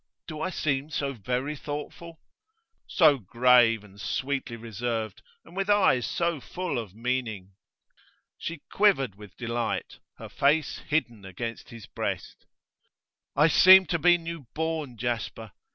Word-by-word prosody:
Do 155 -2 -7
I 185 - -1
seem 145 -4 -1
so 140 -3 -2
very 125 +6 -3
thoughtful?' 150 +3 -7 0.7
'So 155 -6 +4
grave, 115 0 +4
and 100 0 -14
sweetly 135 +1 -2
reserved, 115 0 -4 0.2
and - - -15
with 195 +1 -2
eyes 195 - +4
so 170 -4 -1
full 180 -4 -3
of 105 -4 -8
meaning.' 115 -5 -3 0.9
She 170 -3 -6
quivered 180 - +3
with 105 -1 -14
delight, 120 -1 -3 0.2
her - - -9
face 150 +3 +1
hidden 120 -9 -2
against 110 +5 -6
his 115 -3 -10
breast. - - -5 0.9
'I 150 +3 +5
seem 190 +4 +8
to 170 - +1
be 175 +2 +5
new 165 -5 -7
born, 160 -5 -3
Jasper. 115 -2 -4
130 Hz, 135 wpm, -27 LUFS, 115-160 Hz, 0.9 s, seem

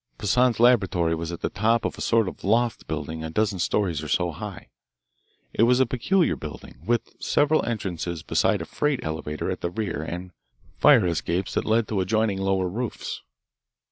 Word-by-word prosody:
Poissan's 120 +3 +2
laboratory 95 -9 +3
was 80 +1 -3
at 85 - -7
the - - -1
top 115 +2 +1
of - - -2
a - - -9
sort 115 -3 +2
of - - -7
loft 115 +4 +1
building 80 0 -4
a 80 - -4
dozen 100 +2 0
stories 85 -3 0
or 75 - -6
so 90 +2 +1
high. 75 - -8 0.8
It - - 0
was 125 +2 +5
a 130 - +5
peculiar 155 +10 +1
building, 75 -1 -9
with 120 +4 -1
several 150 +2 +2
entrances 90 -7 -3
besides - - +1
a - - -8
freight 150 -3 -1
elevator 80 -1 -3
at - - -5
the 85 - -1
rear 95 -4 -3
and 90 +3 -6 0.5
fire - - +6
escapes 85 +2 -1
that - - -1
led 110 0 +2
to 105 - 0
adjoining 105 +1 +1
lower 95 -1 +1
roofs. 115 +6 -4
95 Hz, 180 wpm, -25 LUFS, 85-115 Hz, 0.8 s, fire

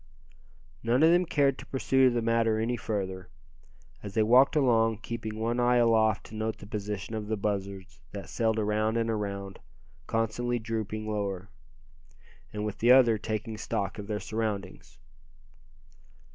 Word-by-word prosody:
None 120 +5 +2
of 160 - +7
them 175 0 +3
cared 140 -3 +2
to - - -9
pursue 130 0 +3
the 120 -1 -1
matter 115 -1 +2
any 115 +2 0
further, 95 -5 -4 0.7
as 100 0 -8
they 110 - +4
walked 125 +7 +5
along, 115 -6 +3
keeping 110 -2 -5
one 115 +2 -1
eye 120 0 +3
aloft 110 -3 +3
to 110 - -11
note 110 0 -2
the - - -11
position 105 0 -5
of 110 -1 -4
the 110 0 -1
buzzards 100 -6 -4
that 100 -1 -7
sailed 110 -2 0
around 110 +1 0
and 115 0 0
around, 100 -2 -4 0.5
constantly 115 +2 -1
dropping 110 -1 -4
lower, 100 -2 -3 1.0
and 105 0 -4
with 105 -1 -5
the 120 +2 +5
other 120 -4 +6
taking 110 0 -4
stock 100 -1 -3
of 100 - -7
their 105 -1 -2
surroundings. 105 -9 -4
110 Hz, 155 wpm, -28 LUFS, 105-115 Hz, 1.0 s, of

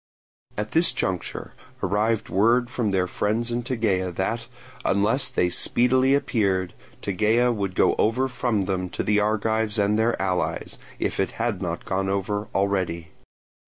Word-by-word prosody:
At 105 +1 -3
this 165 +2 +5
juncture 95 -2 -3 0.3
arrived 105 +4 +1
word 120 +5 +2
from 120 -5 -1
their 95 -2 +1
friends 110 +6 -1
in 120 +1 -1
Tegea 110 -7 0
that, 115 +6 -2 0.4
unless 105 +7 +2
they 90 - +1
speedily 130 +8 +3
appeared, 95 -9 0 0.3
Tegea 110 +5 +2
would 100 -5 -3
go - - +4
over 125 +5 +2
from 120 -6 -1
them 90 -1 -2
to - - 0
the 105 0 +2
Argives 110 +1 0
and 105 +1 +2
their 115 +1 +1
allies, 95 -2 -2 0.2
if - - -2
it 95 - 0
had 115 -4 -1
not 85 -2 -4
gone 95 0 -1
over 100 +2 -2
already. 95 -5 -1
105 Hz, 150 wpm, -24 LUFS, 95-115 Hz, 0.4 s, this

